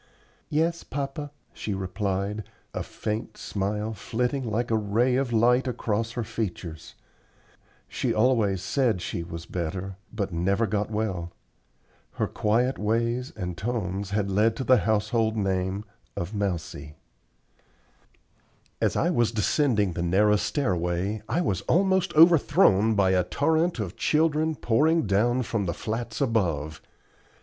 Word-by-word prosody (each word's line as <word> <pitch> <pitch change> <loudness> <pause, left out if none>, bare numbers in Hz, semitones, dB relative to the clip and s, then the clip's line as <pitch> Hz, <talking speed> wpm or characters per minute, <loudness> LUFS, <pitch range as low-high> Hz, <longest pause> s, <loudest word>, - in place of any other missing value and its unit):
"Yes, 165 +3 0
papa," 140 +1 -4 0.2
she 105 - -4
replied, 95 +2 -2 0.3
a - - -2
faint 110 +1 -4
smile 105 +2 -2
flitting 125 +5 -2
like 115 +3 -1
a - - +3
ray 110 +4 +2
of 130 -2 0
light 125 +3 +3
across 115 -2 -1
her 120 - -2
features. 90 -7 -5 0.9
She - - -1
always 110 -5 +2
said 120 -4 +1
she 85 - -4
was 85 0 -7
better, 90 +3 -4
but 100 -4 -3
never 95 +6 +1
got 105 0 -1
well. 100 -6 -2 0.8
Her - - 0
quiet 120 +5 0
ways 115 +4 0
and 90 -1 -4
tones 100 -2 -3
had 100 -1 -1
led 110 +3 +3
to 130 - -3
the 130 0 +5
household 110 +1 +1
name 95 0 -1 0.3
of 85 +5 -3
"Mousie." 85 -7 -3 1.9
As - - +2
I 170 - +2
was 120 -8 +2
descending 110 - +1
the 85 - -3
narrow 105 +5 +3
stairway 95 - -1
I 155 +10 +1
was 100 - 0
almost 190 0 +3
overthrown 130 - +5
by 95 -2 +3
a 90 -1 +3
torrent 160 - +1
of 105 -1 -4
children 155 +2 +2
pouring 155 +7 +2
down 120 +6 +2
from 110 -3 -2
the 85 - -2
flats 115 +3 -4
above. 85 - 0
110 Hz, 135 wpm, -26 LUFS, 95-125 Hz, 1.9 s, the